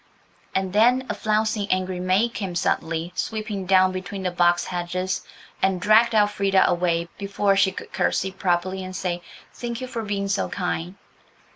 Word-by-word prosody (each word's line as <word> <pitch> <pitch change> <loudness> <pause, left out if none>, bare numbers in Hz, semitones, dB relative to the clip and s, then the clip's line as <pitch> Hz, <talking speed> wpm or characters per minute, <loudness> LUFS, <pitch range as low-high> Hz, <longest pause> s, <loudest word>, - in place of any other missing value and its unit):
And 190 -1 -1
then 245 +5 +4
a - - 0
flouncing, 215 -1 0
angry 185 -1 0
maid 190 +6 +2
came 190 -4 -4
suddenly 165 0 -1
sweeping 215 -3 -3
down 185 0 +5
between 190 +1 -5
the 180 - 0
box 175 0 +3
hedges 180 +1 -2 0.4
and 190 -1 +2
dragged 220 +4 +4
Elfrida 200 -2 +3
away 170 -1 +1
before 200 0 +1
she 195 -1 +3
could - - -9
curtsey 190 +1 0
properly 185 0 -1
and 185 0 -7
say, 175 -1 -2 0.3
"Thank 235 -1 -5
you 255 - -4
for 245 -2 -4
being 200 -2 -2
so 195 0 0
kind." 180 -1 -3
190 Hz, 160 wpm, -24 LUFS, 180-205 Hz, 0.4 s, down